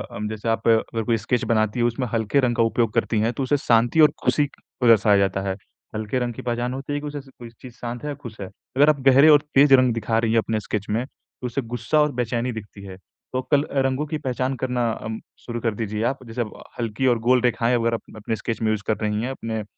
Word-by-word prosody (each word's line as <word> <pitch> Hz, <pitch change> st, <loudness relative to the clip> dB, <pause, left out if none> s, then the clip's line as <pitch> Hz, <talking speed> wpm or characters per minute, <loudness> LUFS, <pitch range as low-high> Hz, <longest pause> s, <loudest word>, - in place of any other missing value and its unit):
अम 105 Hz, +1 st, -3 dB
जैसे 110 Hz, +1 st, -4 dB
आप 115 Hz, -, -1 dB
अगर 115 Hz, 0 st, +2 dB
कोई 115 Hz, +1 st, +1 dB
स्केच 120 Hz, +2 st, -1 dB
बनाती 110 Hz, 0 st, +1 dB
हो, 120 Hz, -, +3 dB
उसमें 120 Hz, +2 st, -2 dB
हल्के 115 Hz, +4 st, +1 dB
रंग 125 Hz, -3 st, +1 dB
का 115 Hz, -, +3 dB
उपयोग 115 Hz, -1 st, +1 dB
करती 110 Hz, -, +1 dB
हैं 110 Hz, +2 st, +1 dB
तो 135 Hz, -, -3 dB
उसे 145 Hz, +3 st, +2 dB
शांति 120 Hz, +3 st, +2 dB
और 150 Hz, -1 st, +7 dB
खुशी 145 Hz, -, +2 dB
को 125 Hz, -, -4 dB
दर्शाया 105 Hz, -3 st, +6 dB
जाता 95 Hz, 0 st, +1 dB
है, -, -, 0 dB, 0.4 s
हल्के 110 Hz, +3 st, -2 dB
रंग 120 Hz, -1 st, -2 dB
की -, -, -8 dB
पहचान 120 Hz, +1 st, -2 dB
होती 135 Hz, +2 st, -5 dB
है 145 Hz, -, -1 dB
कि 150 Hz, -, -6 dB
उसे 145 Hz, 0 st, -5 dB, 0.2 s
कोई 120 Hz, -1 st, -9 dB
चीज़ 125 Hz, -2 st, -10 dB
शांत 120 Hz, +1 st, -6 dB
है 150 Hz, -, -3 dB
या 145 Hz, -, -4 dB
खुश 115 Hz, -5 st, -10 dB
है। 95 Hz, -, -5 dB, 0.3 s
अगर 145 Hz, +2 st, +6 dB
आप 150 Hz, -2 st, +2 dB
गहरे 135 Hz, +3 st, +7 dB
और 145 Hz, -2 st, +7 dB
तेज़ 140 Hz, 0 st, +6 dB
रंग 130 Hz, -2 st, +5 dB
दिखा 115 Hz, 0 st, -1 dB
रही 115 Hz, -1 st, 0 dB
हैं 115 Hz, -, +3 dB
अपने 110 Hz, 0 st, -1 dB
स्केच 105 Hz, -1 st, -4 dB
में, 115 Hz, +4 st, 0 dB
तो 130 Hz, -, -15 dB
उसे 125 Hz, +3 st, -2 dB
गुस्सा 120 Hz, +5 st, -1 dB
और 150 Hz, 0 st, +2 dB
बेचैनी 120 Hz, 0 st, -1 dB
दिखती 105 Hz, -3 st, -9 dB
है, 95 Hz, -1 st, -8 dB
तो 130 Hz, +6 st, -7 dB
कल 145 Hz, -1 st, +4 dB
अ, 140 Hz, -, -2 dB
रंगों 135 Hz, +2 st, 0 dB
की 155 Hz, +1 st, -3 dB
पहचान 130 Hz, -1 st, -2 dB
करना 125 Hz, -2 st, 0 dB
अम 110 Hz, 0 st, -5 dB, 0.3 s
शुरू 120 Hz, -1 st, -4 dB
कर 115 Hz, -1 st, 0 dB
दीजिए 110 Hz, 0 st, -3 dB
आप। 130 Hz, -1 st, -10 dB
जैसे 115 Hz, +2 st, -4 dB
अब 110 Hz, -, -3 dB, 0.3 s
हल्की 115 Hz, +2 st, -1 dB
और 120 Hz, -2 st, +3 dB
गोल 125 Hz, -1 st, +5 dB
रेखाएँ 120 Hz, 0 st, +2 dB
अगर 115 Hz, 0 st, +1 dB
आप 115 Hz, -, -2 dB
अपने 110 Hz, +1 st, -3 dB
स्केच 115 Hz, +1 st, -4 dB
में 110 Hz, -, +1 dB
यूज़ 105 Hz, -1 st, -2 dB
कर 110 Hz, -, +1 dB
रही 105 Hz, 0 st, 0 dB
हैं 125 Hz, +3 st, -2 dB
अपने 110 Hz, -4 st, -4 dB
120 Hz, 260 wpm, -23 LUFS, 110-130 Hz, 0.4 s, और